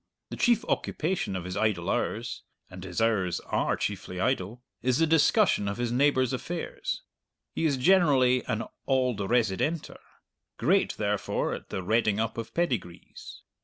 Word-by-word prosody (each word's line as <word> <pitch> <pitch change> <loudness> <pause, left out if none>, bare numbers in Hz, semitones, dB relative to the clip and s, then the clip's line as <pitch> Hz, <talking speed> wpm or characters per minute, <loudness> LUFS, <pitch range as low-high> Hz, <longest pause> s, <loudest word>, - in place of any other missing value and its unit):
The - - -4
chief 240 -3 +2
occupation 165 - -1
of 90 - -3
his 90 +1 -5
idle 105 -6 0
hours - - -2 0.3
(and 90 0 -9
his 90 -2 -4
hours 100 -6 +1
are - - 0
chiefly 95 -2 -4
idle) 120 +1 -1 0.2
is 125 0 +2
the 165 - +4
discussion 160 - +3
of 100 - -2
his 120 -1 -1
neighbour's 130 0 +2
affairs. 165 +6 -4 0.5
He 165 - -1
is 140 -3 0
generally 130 -6 +4
an 110 +2 -1 0.2
"auld 130 -5 +1
residenter;" 120 - 0 0.6
great, - - +2
therefore, - - -1
at - - -8
the 95 - -4
redding 110 +1 +2
up 115 +1 -2
of 115 - -6
pedigrees. 120 - -4
120 Hz, 150 wpm, -28 LUFS, 100-140 Hz, 0.6 s, the